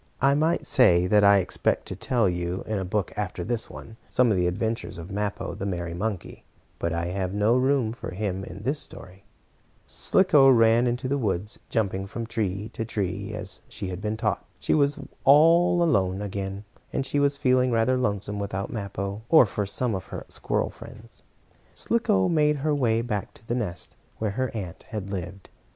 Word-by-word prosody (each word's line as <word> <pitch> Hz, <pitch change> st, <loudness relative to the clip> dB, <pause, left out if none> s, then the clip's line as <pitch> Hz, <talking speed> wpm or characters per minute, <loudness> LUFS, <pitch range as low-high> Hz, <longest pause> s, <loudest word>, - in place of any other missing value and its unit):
I 135 Hz, +2 st, +4 dB
might 155 Hz, +4 st, +1 dB
say 90 Hz, -11 st, +5 dB
that 105 Hz, +2 st, +4 dB
I 100 Hz, 0 st, +7 dB
expect 95 Hz, -, 0 dB
to -, -, -4 dB
tell 120 Hz, -5 st, +1 dB
you, 90 Hz, +1 st, -2 dB
in 110 Hz, -2 st, -2 dB
a -, -, -2 dB
book 95 Hz, 0 st, -2 dB
after 95 Hz, -3 st, -3 dB
this 115 Hz, +3 st, -3 dB
one, 110 Hz, 0 st, -11 dB
some 125 Hz, -2 st, +3 dB
of -, -, +2 dB
the 90 Hz, -1 st, +2 dB
adventures 110 Hz, +4 st, -2 dB
of 85 Hz, +3 st, -8 dB
Mappo, 105 Hz, 0 st, -3 dB
the 100 Hz, -, -4 dB
merry 85 Hz, -3 st, -3 dB
monkey, 100 Hz, +1 st, -4 dB, 0.4 s
but 85 Hz, -, -1 dB
I 85 Hz, +1 st, -1 dB
have 95 Hz, +1 st, -3 dB
no 105 Hz, +3 st, +3 dB
room 130 Hz, -3 st, +2 dB
for 120 Hz, -, -7 dB
him 95 Hz, 0 st, -3 dB
in 95 Hz, +2 st, -9 dB
this 140 Hz, +5 st, -1 dB
story. 95 Hz, +1 st, -11 dB, 0.6 s
Slicko 150 Hz, -8 st, +4 dB
ran 115 Hz, -1 st, +5 dB
on 120 Hz, 0 st, +1 dB
through 130 Hz, +1 st, -5 dB
the 140 Hz, -, +2 dB
woods, 105 Hz, -3 st, -2 dB
jumping 100 Hz, -3 st, -1 dB
from 115 Hz, +3 st, -5 dB
tree 105 Hz, -2 st, -3 dB
to -, -, -3 dB
tree 100 Hz, -2 st, -3 dB
as 100 Hz, -2 st, -7 dB
she 95 Hz, -, -5 dB
had 90 Hz, +1 st, -6 dB
been 105 Hz, +1 st, -2 dB
taught. 105 Hz, -3 st, -1 dB, 0.2 s
She -, -, 0 dB
was 145 Hz, -1 st, +3 dB, 0.3 s
all 170 Hz, +5 st, +6 dB
alone 95 Hz, -, +2 dB
again, 100 Hz, 0 st, -4 dB, 0.3 s
and 135 Hz, -, -1 dB
she 145 Hz, +2 st, 0 dB
was 140 Hz, 0 st, +2 dB
feeling 130 Hz, -2 st, +3 dB
rather 115 Hz, +2 st, +2 dB
lonesome 105 Hz, -4 st, -1 dB
without 100 Hz, -1 st, -4 dB
Mappo, 100 Hz, -1 st, -4 dB
or 160 Hz, -6 st, +7 dB
for 105 Hz, -1 st, -3 dB
some 120 Hz, +3 st, -1 dB
of 95 Hz, -1 st, -4 dB
her -, -, -7 dB
squirrel -, -, -1 dB
friends. -, -, -13 dB, 0.5 s
Slicko 95 Hz, -, +1 dB
made 150 Hz, -2 st, +3 dB
her 155 Hz, -, +2 dB
way 115 Hz, -5 st, +1 dB
back 105 Hz, -4 st, -4 dB
to 115 Hz, -, -19 dB
the -, -, -1 dB
nest 105 Hz, -8 st, -4 dB, 0.2 s
where 110 Hz, -2 st, -1 dB
her 130 Hz, +5 st, -1 dB
aunt 95 Hz, -5 st, -6 dB
had 100 Hz, -3 st, -5 dB
lived. 95 Hz, 0 st, -6 dB
105 Hz, 195 wpm, -26 LUFS, 95-125 Hz, 0.6 s, I